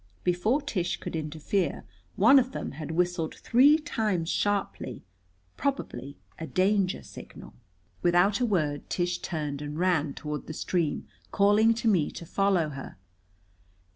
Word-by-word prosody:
Before 215 +11 +1
Tish 185 -11 -2
could - - -6
interfere 160 +4 -2 0.3
one 235 +8 +7
of 260 +1 -2
them - - -4
had 150 +1 -7
whistled 175 -1 -1
three 280 +6 +5
times 215 - -1
sharply, 200 - -2 0.5
probably 205 - -3 0.2
a 160 - -5
danger 190 0 +1
signal. - - -12 0.5
Without 175 +5 +3
a 250 - +2
word 150 -8 -1
Tish 180 0 -1
turned 150 -4 -4
and 150 +1 -5
ran 160 -5 +1
toward 150 -1 -5
the 155 - -5
stream, 170 -3 -1 0.2
calling 210 +3 +4
to 230 0 -2
me 180 -9 +3
to 170 - -8
follow 190 -3 +1
her. 135 -6 -8
180 Hz, 140 wpm, -28 LUFS, 155-205 Hz, 0.5 s, one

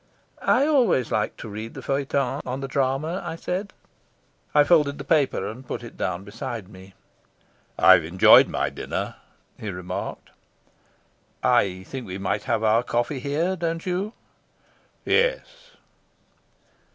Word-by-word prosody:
"I 265 +3 +3
always 245 - +2
like 105 - -1
to - - -8
read 110 +2 -7
the 140 0 -1
on 130 +2 -4
the 135 - -3
drama," 135 +6 -1
I - - -4
said. 185 +4 -4 0.8
I 150 - +6
folded 145 -3 +3
the 140 - -6
paper 145 -1 +1
and 120 +5 -8
put - - -5
it - - -10
down 90 +2 -3
beside 105 0 -6
me. 95 -1 -14 0.8
"I've 95 -3 +7
enjoyed 85 +4 +7
my - - -1
dinner," - - -4 0.4
he 105 - -5
remarked. 90 -1 -6 1.1
"I 95 -1 +2
think 130 +3 -7
we 95 0 -5
might 100 +1 -2
have 115 -1 0
our 110 +1 +4
coffee 120 +3 -1
here, 155 +8 -1
don't 165 -1 -3
you?" 190 +4 -2 0.9
"Yes." - - 0
135 Hz, 135 wpm, -24 LUFS, 105-165 Hz, 1.1 s, I've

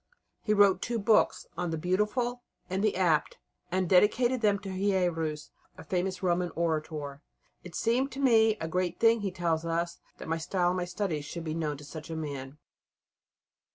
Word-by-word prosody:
He 210 - -1
wrote 200 -2 +5
two 235 0 -1
books 215 0 +3
on 175 - -2
the 160 - -2
"Beautiful" 210 +8 0 0.3
and 190 +2 0
the 215 - +2
"Apt," 170 -5 +1 0.3
and 185 0 +1
dedicated 230 +7 +3
them 205 -2 +3
to 195 0 -8
Hierus, 175 -6 -1 0.3
a - - -9
famous 185 +1 -2
Roman 175 0 +1
orator. 155 -3 -2 0.4
"It 175 -2 -10
seemed 250 +4 +1
to 270 - -6
me 225 -5 +4
a 160 - -3
great 180 +1 -1
thing," 230 -1 +4
he 200 - -1
tells 170 -3 -1
us, 170 +1 -2 0.2
"that - - -9
my 165 0 -1
style 175 +2 0
and 180 - -1
my 180 - -1
studies 175 -5 -3
should 170 +2 -6
be 155 -1 -3
known 155 -3 -2
to 145 - -12
such 150 +1 -9
a 165 - -4
man." 140 -3 -5
180 Hz, 185 wpm, -29 LUFS, 160-205 Hz, 0.4 s, wrote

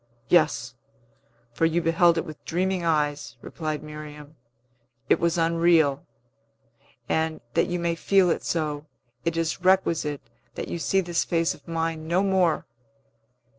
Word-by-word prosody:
"Yes; 150 -8 +3 0.8
for 165 - +2
you 165 +1 +1
beheld 170 +1 +3
it 165 - -1
with 155 -3 -10
dreaming 185 +1 -1
eyes," 150 -6 0
replied 155 +3 -5
Miriam. 150 0 -10 0.7
"It - - +4
was 170 +1 +1
unreal; 165 -3 +3 1.0
and, 160 0 0
that - - +2
you 175 - -2
may 170 -1 0
feel 185 +1 +3
it - - -2
so, 155 -2 -2 0.4
it 165 0 0
is 165 +2 -1
requisite 170 -6 +2 0.3
that - - -5
you 170 - -3
see 195 +3 +2
this 175 -2 0
face 165 0 0
of - - -18
mine 165 -1 -2
no 175 +4 +2
more. 190 -4 +2
165 Hz, 140 wpm, -25 LUFS, 155-175 Hz, 1.0 s, It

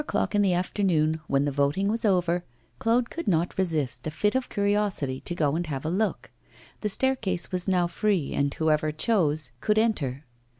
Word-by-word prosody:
At - - -10
four - - -2
o'clock - - -2
in 205 - +3
the 195 -3 +3
afternoon, 170 -4 +1
when 140 +1 +2
the 145 - 0
voting 145 +8 +1
was 225 +2 0
over, 180 -3 +2 0.4
Claude 235 +1 +1
could 335 - -5
not 175 0 +1
resist 150 -8 -1
a - - 0
fit 210 +7 0
of 260 -1 -1
curiosity 200 -10 0
to 175 - -5
go 150 -3 +1
and 175 0 -2
have 140 -1 -4
a 160 - 0
look. 210 +4 -1 0.5
The 210 - -1
staircase 210 -8 0
was 180 0 -1
now 180 -2 +3
free, 180 -3 0
and 140 0 +1
whoever 155 0 +1
chose 155 -3 +1
could 210 0 +1
enter. 155 - 0
175 Hz, 200 wpm, -26 LUFS, 155-205 Hz, 0.5 s, in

